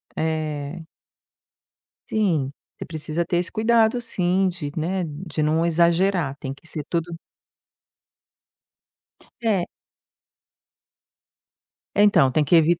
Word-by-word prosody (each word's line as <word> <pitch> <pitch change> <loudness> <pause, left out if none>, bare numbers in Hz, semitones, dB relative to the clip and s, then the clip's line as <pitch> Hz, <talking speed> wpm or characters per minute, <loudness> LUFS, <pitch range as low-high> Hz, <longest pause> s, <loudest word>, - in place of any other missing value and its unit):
É. 155 0 -3 1.2
Sim, 165 -11 +1 0.3
você - - -6
precisa 160 +1 -3
ter 175 - 0
esse 175 +1 -1
cuidado 225 +1 +3
sim, 190 -4 +1
de, 170 -5 -4
né, 180 +4 -1
de 155 0 -5
não 155 +2 +2
exagerar, 170 -2 +2
tem 135 -1 -5
que 140 - -18
ser 150 -3 -5
tudo 170 0 -2 2.3
É. 200 -6 +2 2.3
É, 205 - +5
então, 175 -10 +5
tem 155 - +3
que 145 - -1
evit 165 +2 +4
170 Hz, 110 wpm, -23 LUFS, 155-185 Hz, 2.3 s, É